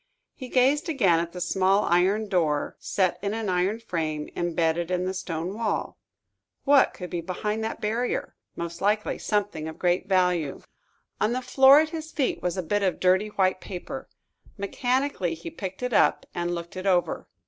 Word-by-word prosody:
He 260 Hz, -, -8 dB
gazed 270 Hz, +7 st, +3 dB
again 195 Hz, -, +3 dB
at 170 Hz, 0 st, -3 dB
the 180 Hz, -, -7 dB
small 190 Hz, +3 st, +2 dB
iron 190 Hz, +5 st, +2 dB
door, 160 Hz, -7 st, 0 dB
set 185 Hz, -2 st, 0 dB
in 200 Hz, +2 st, -2 dB
an 225 Hz, -3 st, -2 dB
iron 185 Hz, +4 st, +1 dB
frame, 160 Hz, -8 st, -3 dB
embedded 170 Hz, 0 st, 0 dB
in 180 Hz, 0 st, 0 dB
the 185 Hz, -, -2 dB
stone 175 Hz, -1 st, -4 dB
wall. 220 Hz, 0 st, -2 dB, 0.6 s
What 280 Hz, -1 st, +4 dB
could 180 Hz, -1 st, -7 dB
be 175 Hz, -, -2 dB
behind 210 Hz, +5 st, -3 dB
that 220 Hz, -, -4 dB
barrier? 230 Hz, +4 st, -2 dB, 0.2 s
Most 170 Hz, 0 st, -6 dB
likely 210 Hz, +2 st, +1 dB
something 205 Hz, -7 st, -1 dB
of 160 Hz, -, -7 dB
great 180 Hz, +1 st, +1 dB
value. 180 Hz, -6 st, +1 dB, 0.6 s
On 215 Hz, +3 st, +1 dB
the 255 Hz, -, -1 dB
floor 265 Hz, +3 st, +7 dB
at 315 Hz, -, -1 dB
his 315 Hz, -1 st, -6 dB
feet 270 Hz, -4 st, -1 dB
was 180 Hz, +1 st, -2 dB
a 185 Hz, -, -1 dB
bit 205 Hz, +5 st, 0 dB
of 190 Hz, -2 st, 0 dB
dirty 185 Hz, +3 st, +3 dB
white 190 Hz, -3 st, 0 dB
paper. 235 Hz, +9 st, -7 dB, 0.5 s
Mechanically, 245 Hz, -3 st, -1 dB
he 165 Hz, +1 st, -8 dB
picked 190 Hz, +4 st, -6 dB
it 250 Hz, -1 st, -2 dB
up -, -, +3 dB
and 175 Hz, 0 st, -2 dB
looked 170 Hz, +1 st, -7 dB
it 185 Hz, +1 st, -4 dB
over. 180 Hz, -2 st, +1 dB
190 Hz, 180 wpm, -26 LUFS, 175-220 Hz, 0.6 s, floor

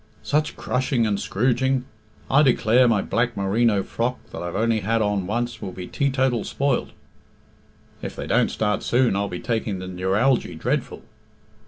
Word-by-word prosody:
"Such 150 Hz, +1 st, 0 dB
crushing 125 Hz, -2 st, 0 dB
and 100 Hz, -2 st, 0 dB
scrooging! 130 Hz, +5 st, +1 dB, 0.4 s
I 135 Hz, +3 st, +4 dB
declare 125 Hz, -2 st, +4 dB
my 110 Hz, -4 st, +2 dB
black 120 Hz, 0 st, -1 dB
merino 100 Hz, +1 st, +2 dB
frock, 120 Hz, +5 st, -2 dB
that -, -, -6 dB
I've 85 Hz, 0 st, -5 dB
only 115 Hz, +1 st, +2 dB
had 115 Hz, +3 st, 0 dB
on 105 Hz, -3 st, 0 dB
once, 120 Hz, +3 st, -2 dB
will 95 Hz, -, -5 dB
be 90 Hz, -, -7 dB
teetotal 130 Hz, -, 0 dB
spoilt." 140 Hz, -2 st, -1 dB, 1.1 s
"If -, -, -6 dB
they -, -, -5 dB
don't -, -, +2 dB
start 105 Hz, -1 st, -1 dB
soon 120 Hz, -4 st, +2 dB
I'll 100 Hz, 0 st, -1 dB
be 90 Hz, -, -5 dB
taking 110 Hz, -4 st, -2 dB
the 95 Hz, -, -6 dB
neuralgy 95 Hz, +8 st, +1 dB
dreadful." -, -, -2 dB
115 Hz, 160 wpm, -23 LUFS, 100-125 Hz, 1.1 s, I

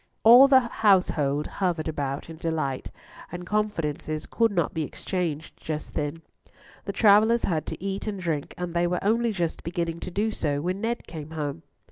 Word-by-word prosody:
All 245 Hz, +5 st, +9 dB
the 265 Hz, -1 st, +6 dB
household 180 Hz, -, +2 dB
hovered 175 Hz, -5 st, -2 dB
about 140 Hz, -3 st, -3 dB
in 165 Hz, -1 st, -9 dB
delight, 155 Hz, -5 st, -2 dB, 0.4 s
and 175 Hz, +1 st, -6 dB
confidences 165 Hz, -7 st, -2 dB
could 230 Hz, -2 st, +1 dB
not 170 Hz, -6 st, 0 dB
be 160 Hz, -, -2 dB
exchanged 165 Hz, 0 st, -3 dB
just 155 Hz, -1 st, -5 dB
then: 150 Hz, +2 st, -3 dB, 0.6 s
the -, -, -2 dB
travellers 220 Hz, +2 st, +5 dB
had 160 Hz, -4 st, -1 dB
to -, -, -5 dB
eat 195 Hz, +2 st, -4 dB
and 205 Hz, -2 st, -3 dB
drink, 160 Hz, -5 st, -3 dB
and 180 Hz, -1 st, -4 dB
they 175 Hz, 0 st, +2 dB
were 180 Hz, +1 st, -2 dB
only 230 Hz, +3 st, +2 dB
just 175 Hz, -5 st, -2 dB
beginning 170 Hz, 0 st, -3 dB
to -, -, -6 dB
do 210 Hz, +5 st, 0 dB
so 145 Hz, -8 st, -1 dB
when 180 Hz, +6 st, -2 dB
Ned 235 Hz, +1 st, -2 dB
came 155 Hz, -2 st, -8 dB
home. 150 Hz, -, -4 dB
170 Hz, 175 wpm, -26 LUFS, 155-205 Hz, 0.6 s, All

